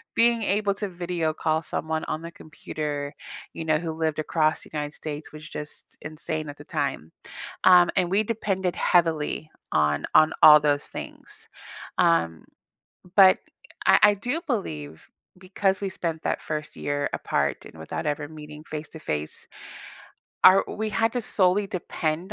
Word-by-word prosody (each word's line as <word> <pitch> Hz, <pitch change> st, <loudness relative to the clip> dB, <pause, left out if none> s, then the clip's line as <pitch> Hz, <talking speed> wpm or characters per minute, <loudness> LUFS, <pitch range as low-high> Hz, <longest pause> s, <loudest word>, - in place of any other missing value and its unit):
Being 235 Hz, 0 st, +4 dB
able 205 Hz, 0 st, +1 dB
to 205 Hz, 0 st, -4 dB
video 175 Hz, -3 st, -2 dB
call 160 Hz, 0 st, 0 dB
someone 160 Hz, 0 st, -3 dB
on 155 Hz, -, -3 dB
the 170 Hz, 0 st, -8 dB
computer, 150 Hz, -3 st, -5 dB, 0.4 s
you -, -, -5 dB
know, 155 Hz, -1 st, +3 dB
who 165 Hz, -1 st, -4 dB
lived 160 Hz, -1 st, -1 dB
across 155 Hz, 0 st, 0 dB
United 150 Hz, -1 st, -5 dB
States 150 Hz, 0 st, -7 dB
was 155 Hz, 0 st, -10 dB
just 150 Hz, 0 st, -9 dB
insane 155 Hz, 0 st, -5 dB
at 145 Hz, -, -9 dB
the 145 Hz, -, -12 dB
time. 140 Hz, -, -3 dB, 0.5 s
Um, 180 Hz, -1 st, +7 dB
and 180 Hz, -2 st, +2 dB
we 205 Hz, +2 st, +4 dB
depended 195 Hz, -5 st, -2 dB
heavily 160 Hz, -3 st, +1 dB, 0.2 s
on 75 Hz, -1 st, +1 dB
on 155 Hz, -, +6 dB
all 150 Hz, 0 st, +10 dB
those 145 Hz, -1 st, +1 dB
things. -, -, -10 dB, 0.5 s
Um, 85 Hz, -1 st, +2 dB, 0.7 s
but 190 Hz, -2 st, +8 dB, 0.5 s
I -, -, +7 dB
I 205 Hz, 0 st, +7 dB
do 245 Hz, +11 st, -3 dB
believe, 80 Hz, -, -4 dB, 0.3 s
because 190 Hz, +1 st, -1 dB
we 200 Hz, -, -2 dB
spent 165 Hz, -3 st, -4 dB
that -, -, -1 dB
1st 155 Hz, -1 st, -5 dB
year 145 Hz, 0 st, -2 dB
apart -, -, -1 dB
and 80 Hz, -, -13 dB
without 80 Hz, -, -5 dB
ever 145 Hz, 0 st, -2 dB
meeting 150 Hz, -1 st, -10 dB
face 155 Hz, -1 st, -5 dB
to 160 Hz, -, -11 dB
face, 75 Hz, -, -4 dB, 1.0 s
our 190 Hz, +1 st, +8 dB
we 220 Hz, +1 st, -3 dB
had 225 Hz, +3 st, +1 dB
to 245 Hz, -, 0 dB
solely 200 Hz, -1 st, +2 dB
depend 170 Hz, 0 st, -3 dB
160 Hz, 155 wpm, -25 LUFS, 150-185 Hz, 1.0 s, all